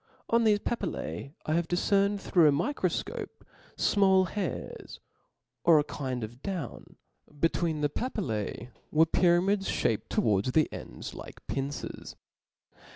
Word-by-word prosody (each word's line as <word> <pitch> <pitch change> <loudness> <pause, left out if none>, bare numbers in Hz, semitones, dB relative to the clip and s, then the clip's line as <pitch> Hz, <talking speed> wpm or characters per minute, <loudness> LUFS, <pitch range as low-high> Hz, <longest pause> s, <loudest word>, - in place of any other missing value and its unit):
On 235 0 +4
thefe 210 -2 +3
papillae, 180 -8 -3
I 155 - 0
have 170 0 +1
difcerned 200 +3 +2
through 175 -4 +4
a - - +6
microfcope, 175 - -2 0.3
fmall 190 -3 +4
hairs 200 -5 -5 0.6
or 165 -2 +7
a 150 - +4
kind 130 -5 -4
of 120 +4 -8
down 180 -10 -5 0.3
J - - -23
between 165 -1 +1
the 145 - +2
papillse 125 - -3 0.2
were 160 +1 +5
pyramids 185 +4 +3
fhaped 110 - 0
towards 105 +3 +1
the 155 -1 +4
ends - - -7
like - - -10
pincers. 135 -2 -4
165 Hz, 130 wpm, -29 LUFS, 140-195 Hz, 0.6 s, or